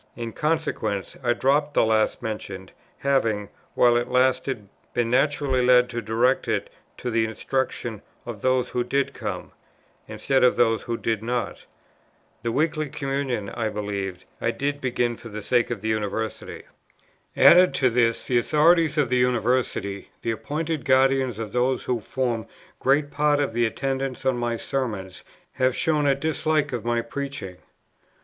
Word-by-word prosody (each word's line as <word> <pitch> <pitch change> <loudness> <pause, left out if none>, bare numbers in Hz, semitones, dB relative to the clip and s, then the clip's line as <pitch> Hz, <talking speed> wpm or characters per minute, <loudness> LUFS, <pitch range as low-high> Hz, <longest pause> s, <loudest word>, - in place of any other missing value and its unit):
In 115 -2 -5
consequence 150 - -1
I 120 -1 +3
dropped 145 +4 +1
the - - +4
last 110 +1 +1
mentioned, 95 -4 -6 0.3
having, 115 -7 0 0.3
while 120 -1 +5
it 120 +1 -1
lasted, 125 -3 +1 0.3
been 120 -1 0
naturally 140 -1 +2
led 125 0 +5
to 120 -1 -3
direct 115 +4 +1
it - - -1 0.3
to 125 - -4
the 115 0 +2
instruction 115 -1 -3 0.2
of 115 -4 -7
those 130 -1 +1
who 125 - -1
did 140 +2 0
come, - - -5 0.6
instead 135 -1 0
of 125 - +5
those 115 -2 +2
who 115 -1 -3
did 115 -2 -1
not. 120 -1 -3 0.8
The 115 0 -2
Weekly 155 +3 0
Communion, 135 -7 -2
I 115 -2 -2
believe, 100 -3 -4 0.2
I - - +1
did 145 +1 -2
begin 120 -2 0
for 115 - -10
the 105 0 -7
sake 120 +1 +2
of 120 -5 -4
the 110 - -2
University. 110 +1 -3 0.7
"Added 180 +1 +7
to 130 -2 +3
this 115 -1 +1
the 125 -2 +2
authorities 160 +4 +3
of 145 -3 +3
the 125 - +3
University, 120 -5 0
the 115 - 0
appointed 150 +5 -3
guardians 130 -2 +3
of 110 -2 -5
those 125 +2 +1
who 125 -2 -1
form 120 0 -2 0.3
great 145 +2 +2
part 150 0 +2
of 140 -6 -1
the 120 0 +2
attendants 135 +2 -3
on 130 -1 +2
my 120 -1 -1
Sermons, 105 -9 -4 0.3
have 130 -1 +1
shown 150 -2 +1
a 140 - +4
dislike 155 -1 0
of 120 - -3
my 120 0 0
preaching. 135 -7 -6
125 Hz, 160 wpm, -24 LUFS, 115-135 Hz, 0.8 s, Added